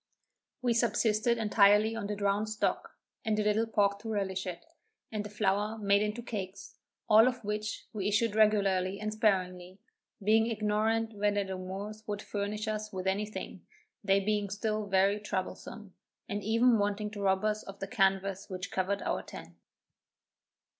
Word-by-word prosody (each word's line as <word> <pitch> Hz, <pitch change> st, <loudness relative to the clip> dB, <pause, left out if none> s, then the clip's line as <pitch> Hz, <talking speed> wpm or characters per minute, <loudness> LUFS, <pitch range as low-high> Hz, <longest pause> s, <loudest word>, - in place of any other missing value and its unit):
We 245 Hz, -1 st, +3 dB
subsisted 230 Hz, 0 st, +2 dB
entirely 210 Hz, 0 st, +4 dB
on 215 Hz, -3 st, -3 dB
the 210 Hz, -, -2 dB
drowned 200 Hz, +1 st, 0 dB
stock, 215 Hz, -, -2 dB, 0.3 s
and 220 Hz, -2 st, 0 dB
a 210 Hz, -, +1 dB
little 210 Hz, +2 st, +2 dB
pork 200 Hz, -2 st, +2 dB
to 225 Hz, -, -7 dB
relish 190 Hz, -3 st, -2 dB
it, 175 Hz, -2 st, -6 dB, 0.5 s
and 215 Hz, -1 st, -2 dB
the 210 Hz, -, -7 dB
flour 210 Hz, +1 st, 0 dB
made 200 Hz, -1 st, +3 dB
into 210 Hz, +3 st, -2 dB
cakes; 200 Hz, -4 st, -6 dB, 0.3 s
all 220 Hz, +2 st, +7 dB
of 250 Hz, -2 st, -2 dB
which 210 Hz, 0 st, -3 dB
we 205 Hz, -2 st, -2 dB
issued 210 Hz, +1 st, +2 dB
regularly 200 Hz, -3 st, +2 dB
and 215 Hz, 0 st, -3 dB
sparingly, 185 Hz, -4 st, 0 dB, 0.5 s
being 220 Hz, +2 st, +4 dB
ignorant 220 Hz, +1 st, 0 dB
whether 205 Hz, 0 st, +1 dB
the 190 Hz, -1 st, -5 dB
Moors 195 Hz, +4 st, -6 dB
would 205 Hz, -1 st, -3 dB
furnish 210 Hz, +1 st, -3 dB
us 215 Hz, 0 st, -3 dB
with 185 Hz, -1 st, -5 dB
any 195 Hz, +2 st, 0 dB
thing, 215 Hz, -, -7 dB, 0.4 s
they 195 Hz, -1 st, +4 dB
being 205 Hz, 0 st, 0 dB
still 215 Hz, +1 st, -2 dB
very 195 Hz, +1 st, +3 dB
troublesome, 205 Hz, 0 st, -5 dB, 0.3 s
and 205 Hz, 0 st, -3 dB
even 230 Hz, +2 st, +4 dB
wanting 205 Hz, +1 st, -1 dB
to 205 Hz, -2 st, -7 dB
rob 190 Hz, +1 st, +2 dB
us 215 Hz, 0 st, 0 dB
of 195 Hz, 0 st, -10 dB
the 195 Hz, -, -4 dB
canvass 195 Hz, -1 st, +1 dB
which 185 Hz, 0 st, -5 dB
covered 190 Hz, +2 st, -1 dB
our -, -, -1 dB
tent. -, -, -11 dB
210 Hz, 165 wpm, -31 LUFS, 195-215 Hz, 0.5 s, all